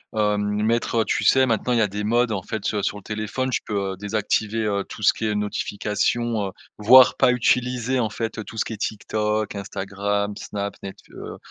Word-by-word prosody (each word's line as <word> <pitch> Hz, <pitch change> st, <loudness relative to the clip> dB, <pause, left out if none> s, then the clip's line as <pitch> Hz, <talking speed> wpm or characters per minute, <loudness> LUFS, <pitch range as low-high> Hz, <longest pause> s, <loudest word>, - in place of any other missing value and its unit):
heu, 105 Hz, -1 st, +2 dB
mettre, 105 Hz, +3 st, 0 dB
heu -, -, 0 dB
tu -, -, -1 dB
sais 130 Hz, 0 st, +5 dB
maintenant 120 Hz, +1 st, 0 dB
il 115 Hz, -, +2 dB
y -, -, +4 dB
a 105 Hz, -, +3 dB
des 105 Hz, +1 st, -4 dB
modes 120 Hz, +1 st, +2 dB
en 95 Hz, -3 st, -2 dB
fait, 110 Hz, -1 st, -3 dB
heu, 105 Hz, -, 0 dB
sur 105 Hz, -, -1 dB
le 100 Hz, -, -12 dB
téléphone, 110 Hz, +5 st, -3 dB
tu -, -, 0 dB
peux 100 Hz, -2 st, -2 dB
désactiver, 110 Hz, +1 st, -1 dB
heu, 100 Hz, -1 st, -1 dB
tout 105 Hz, -, -9 dB
ce -, -, +6 dB
qui 110 Hz, -, -5 dB
est 105 Hz, -1 st, 0 dB
notification, 105 Hz, +1 st, -1 dB
heu, -, -, -6 dB, 0.3 s
voire 125 Hz, +4 st, +7 dB
pas 130 Hz, -2 st, +5 dB
utiliser 125 Hz, +1 st, +1 dB
en 110 Hz, -3 st, 0 dB
fait 115 Hz, +1 st, -4 dB
tout 110 Hz, -, -10 dB
ce -, -, +2 dB
qui -, -, -6 dB
est -, -, -6 dB
TikTok, 105 Hz, +1 st, -2 dB
Instagram, 100 Hz, +1 st, -2 dB
Snap, 100 Hz, 0 st, -5 dB
Netfl 95 Hz, -, -10 dB
heu -, -, -8 dB
105 Hz, 215 wpm, -23 LUFS, 105-115 Hz, 0.3 s, voire